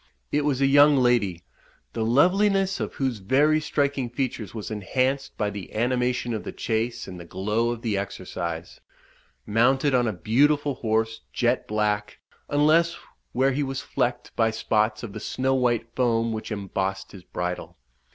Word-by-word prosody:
It 150 Hz, -, +1 dB
was 140 Hz, -3 st, 0 dB
a -, -, +5 dB
young 145 Hz, +1 st, +6 dB
lady, 115 Hz, -9 st, +2 dB, 0.5 s
the 110 Hz, -, -1 dB
loveliness 190 Hz, -, +3 dB
of -, -, -4 dB
whose 130 Hz, -5 st, -1 dB
very 145 Hz, +9 st, +3 dB
striking 140 Hz, -4 st, 0 dB
features 120 Hz, -4 st, -3 dB
was 110 Hz, -1 st, -6 dB
enhanced 130 Hz, +7 st, -1 dB
by 105 Hz, -2 st, 0 dB
the 100 Hz, -1 st, -8 dB
animation 125 Hz, +1 st, 0 dB
of 110 Hz, -, -3 dB
the -, -, -5 dB
chase 115 Hz, +1 st, -2 dB
and 90 Hz, -2 st, -8 dB
the -, -, -8 dB
glow 105 Hz, +7 st, -1 dB
of 120 Hz, -1 st, -4 dB
the 105 Hz, -4 st, 0 dB
exercise, 85 Hz, -3 st, -5 dB, 0.6 s
mounted 130 Hz, +6 st, +3 dB
on 125 Hz, -2 st, +3 dB
a -, -, +1 dB
beautiful 140 Hz, -, +2 dB
horse, 110 Hz, -2 st, -1 dB
jet -, -, 0 dB
black, 105 Hz, -1 st, -1 dB, 0.3 s
unless 155 Hz, +4 st, +3 dB, 0.3 s
where 130 Hz, +3 st, +2 dB
he 140 Hz, +3 st, -1 dB
was 135 Hz, -1 st, -2 dB
flecked 120 Hz, 0 st, -2 dB
by 115 Hz, -1 st, +3 dB
spots 110 Hz, 0 st, 0 dB
of 110 Hz, -4 st, -6 dB
the 110 Hz, -, -6 dB
snow 130 Hz, +5 st, -1 dB
white 120 Hz, -3 st, 0 dB
foam 115 Hz, -2 st, +1 dB
which 110 Hz, +1 st, -5 dB
embossed 95 Hz, -1 st, -3 dB
his 95 Hz, -, -11 dB
bridle. 90 Hz, 0 st, -5 dB
120 Hz, 160 wpm, -25 LUFS, 105-135 Hz, 0.6 s, young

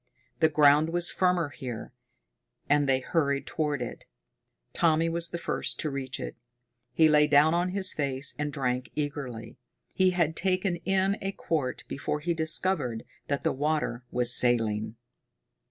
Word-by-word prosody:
The 160 Hz, -, +4 dB
ground 150 Hz, +1 st, +4 dB
was 175 Hz, 0 st, +1 dB
firmer 180 Hz, -4 st, +1 dB
here, 125 Hz, -5 st, -8 dB, 0.7 s
and 145 Hz, -1 st, +2 dB
they 130 Hz, -1 st, +2 dB
hurried 140 Hz, -1 st, -1 dB
toward 150 Hz, -5 st, -2 dB
it. 120 Hz, -, -8 dB, 0.7 s
Tommy 165 Hz, 0 st, +2 dB
was 170 Hz, 0 st, 0 dB
the 170 Hz, -, -4 dB
first -, -, -2 dB
to 155 Hz, -, -3 dB
reach 135 Hz, -2 st, -4 dB
it. -, -, -6 dB, 0.6 s
He 160 Hz, -, +4 dB
lay 150 Hz, -1 st, +4 dB
down 150 Hz, +2 st, +4 dB
on 175 Hz, +1 st, +1 dB
his 190 Hz, 0 st, +1 dB
face 140 Hz, -2 st, -1 dB
and 150 Hz, 0 st, -2 dB
drank 125 Hz, -3 st, -2 dB
eagerly. 140 Hz, -6 st, -5 dB, 0.3 s
He 185 Hz, 0 st, +3 dB
had 170 Hz, -3 st, 0 dB
taken 185 Hz, 0 st, 0 dB
in 190 Hz, +3 st, 0 dB
a 195 Hz, -, -2 dB
quart 150 Hz, -9 st, -3 dB
before 145 Hz, +2 st, -3 dB
he 170 Hz, +3 st, -1 dB
discovered 160 Hz, -6 st, +2 dB, 0.2 s
that 140 Hz, -1 st, -2 dB
the -, -, +1 dB
water 145 Hz, -4 st, -2 dB
was 125 Hz, 0 st, +2 dB
saline. 110 Hz, -3 st, +3 dB
150 Hz, 155 wpm, -27 LUFS, 135-170 Hz, 0.7 s, The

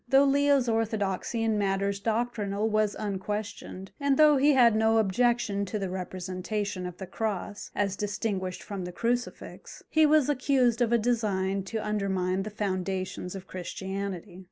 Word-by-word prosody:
Though 270 Hz, +2 st, +6 dB
Leo's 280 Hz, -2 st, +3 dB
orthodoxy 225 Hz, -1 st, -1 dB
in 220 Hz, -2 st, +1 dB
matters 200 Hz, 0 st, 0 dB
doctrinal 215 Hz, -2 st, -1 dB
was 215 Hz, -1 st, +1 dB
unquestioned, 205 Hz, -1 st, -4 dB
and 280 Hz, -1 st, +2 dB
though 300 Hz, -2 st, +6 dB
he 285 Hz, +2 st, +5 dB
had 240 Hz, -4 st, +6 dB
no 220 Hz, +1 st, +3 dB
objection 220 Hz, 0 st, +2 dB
to 210 Hz, -, -3 dB
the 195 Hz, -3 st, -3 dB
representation 185 Hz, +1 st, -4 dB
of 180 Hz, -1 st, -9 dB
the 190 Hz, -, -6 dB
cross, 205 Hz, 0 st, -4 dB
as 200 Hz, -2 st, 0 dB
distinguished 200 Hz, -2 st, -3 dB
from 195 Hz, -3 st, -5 dB
the 180 Hz, -, -5 dB
crucifix, 240 Hz, +5 st, -4 dB
he 315 Hz, -1 st, +5 dB
was 300 Hz, -2 st, +4 dB
accused 260 Hz, -4 st, +2 dB
of 235 Hz, -1 st, +2 dB
a 235 Hz, -, +5 dB
design 205 Hz, -5 st, 0 dB
to 220 Hz, +3 st, -4 dB
undermine 190 Hz, -3 st, 0 dB
the 210 Hz, -, -4 dB
foundations 190 Hz, -2 st, -3 dB
of 190 Hz, -1 st, -7 dB
Christianity. 190 Hz, 0 st, -5 dB
210 Hz, 155 wpm, -28 LUFS, 190-235 Hz, -, Though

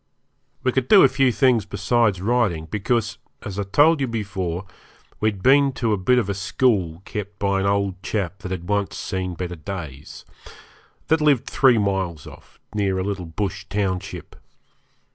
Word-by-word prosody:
We 130 Hz, -, +2 dB
could 130 Hz, 0 st, -1 dB
do 205 Hz, -, +8 dB
a -, -, +8 dB
few 135 Hz, -1 st, +2 dB
things 125 Hz, -3 st, +3 dB
besides 105 Hz, -1 st, +1 dB
riding, 105 Hz, -7 st, +1 dB
because, 105 Hz, +3 st, -1 dB, 0.2 s
as 100 Hz, -1 st, -5 dB
I -, -, 0 dB
told 150 Hz, +3 st, +5 dB
you 135 Hz, -, +1 dB
before, 95 Hz, -5 st, -3 dB, 0.5 s
we 110 Hz, -, +2 dB
had 100 Hz, -3 st, -8 dB
been 140 Hz, +1 st, +5 dB
to 115 Hz, -4 st, 0 dB
a -, -, +1 dB
bit 125 Hz, +7 st, +2 dB
of 120 Hz, -, +1 dB
a 100 Hz, -, -1 dB
school 95 Hz, -3 st, 0 dB
kept 100 Hz, -1 st, -6 dB
by 100 Hz, -1 st, 0 dB
an 95 Hz, -, 0 dB
old 100 Hz, -2 st, 0 dB
chap 95 Hz, -3 st, -3 dB
that 95 Hz, -, -7 dB
had 90 Hz, -2 st, -5 dB
once 100 Hz, -1 st, -1 dB
seen 95 Hz, -2 st, -3 dB
better 90 Hz, 0 st, -5 dB
days, 75 Hz, -5 st, -8 dB, 0.8 s
that 160 Hz, 0 st, +3 dB
lived 145 Hz, -5 st, +3 dB
three 130 Hz, -4 st, +4 dB
miles 95 Hz, -6 st, -1 dB
off, -, -, -15 dB
near 100 Hz, -3 st, 0 dB
a 95 Hz, -, -1 dB
little 95 Hz, -3 st, -4 dB
bush 95 Hz, +3 st, -4 dB
township. 95 Hz, -2 st, -3 dB
100 Hz, 175 wpm, -22 LUFS, 95-120 Hz, 0.8 s, do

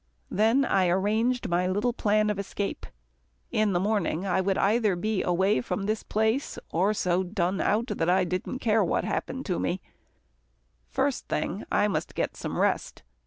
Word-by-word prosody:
Then 225 Hz, +7 st, +3 dB
I 185 Hz, -6 st, +2 dB
arranged 215 Hz, +7 st, +1 dB
my 175 Hz, +1 st, +1 dB
little 205 Hz, +6 st, 0 dB
plan 215 Hz, -1 st, +2 dB
of 205 Hz, -, -4 dB
escape. 200 Hz, 0 st, -4 dB, 0.6 s
In 215 Hz, -2 st, +2 dB
the 175 Hz, -, +2 dB
morning, 195 Hz, -3 st, 0 dB
I 190 Hz, 0 st, +1 dB
would 190 Hz, 0 st, 0 dB
either 210 Hz, -1 st, +2 dB
be 210 Hz, +2 st, -1 dB
away 190 Hz, +4 st, +2 dB
from 215 Hz, -, -3 dB
this 215 Hz, +2 st, -1 dB
place, 220 Hz, +6 st, 0 dB
or 185 Hz, +5 st, +2 dB
so 180 Hz, -2 st, +1 dB
done 185 Hz, 0 st, -1 dB
out 220 Hz, +3 st, +1 dB
that 165 Hz, -9 st, -1 dB
I 185 Hz, +1 st, +4 dB
didn't 185 Hz, +7 st, -3 dB
care 220 Hz, -4 st, +2 dB
what 175 Hz, -, 0 dB
happened 265 Hz, +1 st, -3 dB
to 180 Hz, -, -1 dB
me. 185 Hz, -, -1 dB, 1.1 s
First -, -, -1 dB
thing -, -, -2 dB
I -, -, +3 dB
must -, -, -3 dB
get -, -, -1 dB
some -, -, -5 dB
rest. -, -, 0 dB
200 Hz, 170 wpm, -27 LUFS, 185-220 Hz, 1.1 s, I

